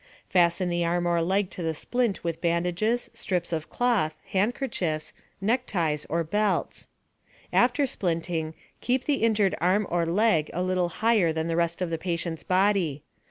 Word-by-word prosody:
Fasten 180 0 +3
the 175 0 0
arm 175 +1 0
or 170 -1 +2
leg 190 +3 0
to - - -6
the 160 -1 -1
splint 240 +3 -1
with 165 -1 -3
bandages, 180 +7 0
strips 175 -2 -2
of 160 0 -3
cloth, 225 -11 +1 0.2
handkerchiefs, 190 - -1 0.3
neckties, 190 - 0
or 165 +2 0
belts. 205 +4 -1 0.7
After 250 +4 +3
splinting, 165 - -2 0.2
keep 255 +1 0
the 290 -2 +1
injured 215 -4 +3
arm 190 +4 +3
or 170 -1 +1
leg 180 -3 +2
a 180 - 0
little 185 -1 +1
higher 210 -2 +2
than 160 +1 -2
the 165 - -1
rest 170 +1 0
of 170 - -3
the 165 - -2
patient's 170 -2 -3
body. 185 -6 +1
175 Hz, 160 wpm, -26 LUFS, 165-210 Hz, 0.7 s, Fasten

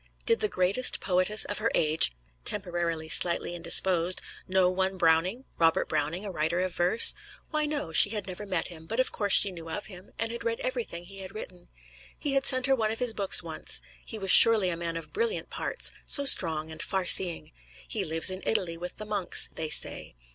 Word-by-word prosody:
Did 460 -1 +1
the 430 - -1
greatest 200 - -1
poetess 185 +3 0
of 205 - -5
the 225 +1 -1
age 155 - +2 0.3
(temporarily 170 - -4
slightly 170 +2 +2
indisposed) 175 +1 0 0.3
know 185 -1 +1
one 190 +1 -2
Browning 180 +8 0
Robert 165 -1 +1
Browning, 155 +6 -4
a 200 - -6
writer 165 +1 -3
of 185 -1 -4
verse? 180 +6 +5 0.4
Why, 305 -1 -1
no; 290 - -5
she 185 - +8
had 210 -2 -6
never 195 +2 -9
met 185 -3 -3
him, 160 -2 -13
but 225 +8 -5
of 255 - 0
course 205 -2 0
she 200 - +6
knew 165 -2 -11
of 185 +6 -6
him, 185 -1 -13
and 230 0 -3
had 235 0 -7
read 230 0 -3
everything 240 -9 -5
he 195 +2 -14
had 190 +1 -11
written. 180 -4 -11 0.5
He 290 -3 -4
had 275 0 0
sent 255 -1 +1
her 270 -1 +2
one 220 -4 -2
of 220 - -5
his 245 -2 -1
books 200 -3 +5
once. - - -4 0.2
He 225 - -9
was 195 -3 -1
surely 220 -5 +7
a - - -4
man 165 0 -5
of 165 - -10
brilliant 460 +2 -4
parts - - 0
so 280 - +3
strong 160 - +3
and 160 0 -8
farseeing! 185 -1 +3 0.4
He - - -4
lives 160 +3 +1
in 185 +1 -8
Italy, 170 -6 -2
with 175 +1 -9
the 215 - -10
monks, 205 -4 +1
they 160 -1 -6
say. 155 - -1
185 Hz, 205 wpm, -26 LUFS, 170-220 Hz, 0.5 s, she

